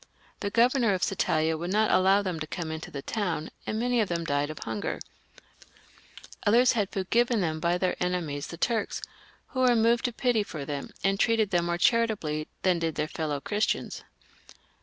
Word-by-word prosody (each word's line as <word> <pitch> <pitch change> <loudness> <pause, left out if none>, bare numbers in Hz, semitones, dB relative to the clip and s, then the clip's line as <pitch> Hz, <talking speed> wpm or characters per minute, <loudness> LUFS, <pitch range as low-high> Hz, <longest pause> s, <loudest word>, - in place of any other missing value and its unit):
The 205 - -2
governor 235 -1 +3
of 185 - -3
Satalia 160 -4 +1
would 175 +2 -3
not 215 +2 +3
allow 195 +2 +4
them 180 -4 -3
to 155 - -4
come 165 -1 -4
into 160 0 -6
the 140 -1 -7
town, 180 -8 -2 0.2
and 215 - -1
many 245 0 +2
of 210 - -1
them 170 -1 -1
died 145 -1 0
of 155 - -7
hunger; 110 -2 -3 1.5
others 240 +4 +5
had 210 -5 0
food 190 -2 -4
given 240 -1 +3
them 160 -3 -1
by 170 +2 +1
their 180 0 0
enemies 165 -5 -2
the 170 - -8
Turks, 225 +3 -1 0.5
who 260 - -4
were 250 -1 +5
moved 235 +2 +3
to 245 - +1
pity 240 -2 +1
for 155 -8 -6
them, 140 -1 -4
and 195 0 +1
treated 225 -3 +2
them 175 -2 +2
more 170 0 0
charitably 195 -8 +1 0.2
than 180 -2 +3
did 165 -2 -1
their 150 - -1
fellow 155 -2 -3
Christians. 210 +8 -1
185 Hz, 190 wpm, -28 LUFS, 160-225 Hz, 1.5 s, others